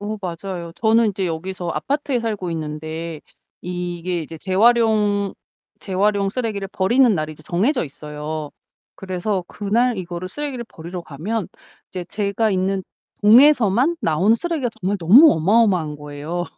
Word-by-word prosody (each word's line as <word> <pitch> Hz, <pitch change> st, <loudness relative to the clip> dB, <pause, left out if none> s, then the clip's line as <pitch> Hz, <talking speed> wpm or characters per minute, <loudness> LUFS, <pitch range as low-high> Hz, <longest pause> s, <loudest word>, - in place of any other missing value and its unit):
어 210 Hz, +1 st, -4 dB
맞아요. 175 Hz, -1 st, -5 dB
저는 225 Hz, +1 st, +3 dB
인제 195 Hz, -2 st, -1 dB
여기서 175 Hz, +2 st, -4 dB
아파트에 280 Hz, -, -1 dB
살고 210 Hz, -6 st, -3 dB
있는데 155 Hz, +1 st, -5 dB, 0.4 s
이게 175 Hz, 0 st, -3 dB
이제 160 Hz, +1 st, -9 dB
재활용 210 Hz, 0 st, +2 dB, 0.5 s
재활용 200 Hz, +1 st, +1 dB
쓰레기를 210 Hz, -3 st, -3 dB
버리는 235 Hz, +6 st, +3 dB
날이 155 Hz, -2 st, -2 dB
이제 155 Hz, -, -14 dB
정해져 205 Hz, -, 0 dB
있어요. 150 Hz, +1 st, -6 dB, 0.4 s
그래서 185 Hz, 0 st, -3 dB
그날 230 Hz, +4 st, 0 dB
이거를 180 Hz, -1 st, -5 dB
쓰레기를 270 Hz, +2 st, -4 dB
버리러 170 Hz, +2 st, -8 dB
가면 180 Hz, +8 st, -4 dB, 0.4 s
이제 180 Hz, -2 st, -6 dB
제가 205 Hz, +3 st, -1 dB
있는 190 Hz, 0 st, 0 dB, 0.4 s
동에서만 250 Hz, -, +5 dB
나온 180 Hz, +8 st, +3 dB
쓰레기가 305 Hz, 0 st, -1 dB
정말 195 Hz, +3 st, 0 dB
너무 230 Hz, -, +8 dB
어마어마한 180 Hz, -3 st, +2 dB
거예요. 150 Hz, +4 st, -5 dB
190 Hz, 335 characters per minute, -21 LUFS, 170-220 Hz, 0.5 s, 너무